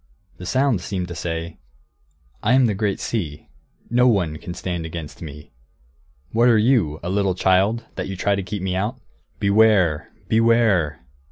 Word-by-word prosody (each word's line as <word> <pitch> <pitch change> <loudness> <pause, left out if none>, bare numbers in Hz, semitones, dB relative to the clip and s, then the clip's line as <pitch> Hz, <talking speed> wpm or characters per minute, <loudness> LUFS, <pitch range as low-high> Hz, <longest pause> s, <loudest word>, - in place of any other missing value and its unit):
The 90 - -8
sound 130 -6 +1
seemed 90 0 -3
to 85 - -6
say, 85 -1 -4 0.8
"I 115 - +2
am 130 0 +5
the 110 - +1
great 100 0 -1
sea. 80 -10 -4 0.4
No 125 +1 +4
one 90 -10 +1
can 85 +2 -8
stand 90 -2 -4
against 80 -2 -7
me. 75 -2 -9 0.8
What 120 +2 +4
are 115 - +5
you, 105 - +2
a 90 - -3
little 100 -2 +1
child, 95 +6 +2
that - - -3
you 95 -1 -5
try 100 +2 +1
to 100 - -1
keep 95 +1 -5
me 95 -1 -1
out? 105 +7 -2 0.4
Beware! 100 -6 +3 0.2
Beware!" 110 - +2
95 Hz, 165 wpm, -22 LUFS, 85-110 Hz, 0.8 s, am